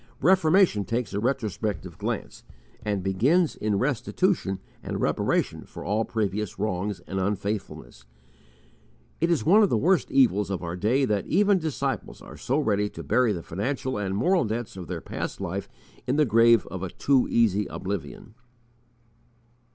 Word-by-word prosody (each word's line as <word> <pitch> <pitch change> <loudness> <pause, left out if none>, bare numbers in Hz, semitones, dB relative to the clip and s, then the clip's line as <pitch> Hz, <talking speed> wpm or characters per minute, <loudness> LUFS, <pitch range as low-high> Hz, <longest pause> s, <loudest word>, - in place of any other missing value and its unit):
Reformation 180 - +4
takes 115 +1 -3
a 100 - -1
retrospective 110 -5 -2
glance - - -4 0.4
and 100 -3 -1
begins 135 - +2
in 105 -1 -1
restitution 135 - 0 0.2
and - - -4
reparation - - 0
for - - -10
all 110 +2 0
previous 105 -2 -2
wrongs 100 0 -2
and 95 - -4
unfaithfulness. 95 - -4 1.1
It 165 - +1
is 170 -4 +1
one 200 +7 +6
of 205 - +4
the 115 - +2
worst 180 - +2
evils 105 -7 +3
of 95 -2 -3
our 85 0 -4
day 120 +9 +2
that 105 -4 -1
even 200 +2 +3
disciples 155 -4 -3
are - - -12
so 135 - -1
ready 105 -8 +1
to - - -9
bury 125 -3 +2
the 85 -5 -4
financial 125 +5 -3
and 95 -1 -2
moral 180 - +3
debts 115 -1 -4
of 90 -3 -8
their - - -5
past - - -5
life - - -4 0.4
in 130 - +1
the 150 0 +4
grave 115 -1 +5
of 95 - -5
a 95 - -3
too 135 +7 +2
easy 105 -3 +2
oblivion. 100 +3 -6
110 Hz, 160 wpm, -26 LUFS, 100-140 Hz, 1.1 s, one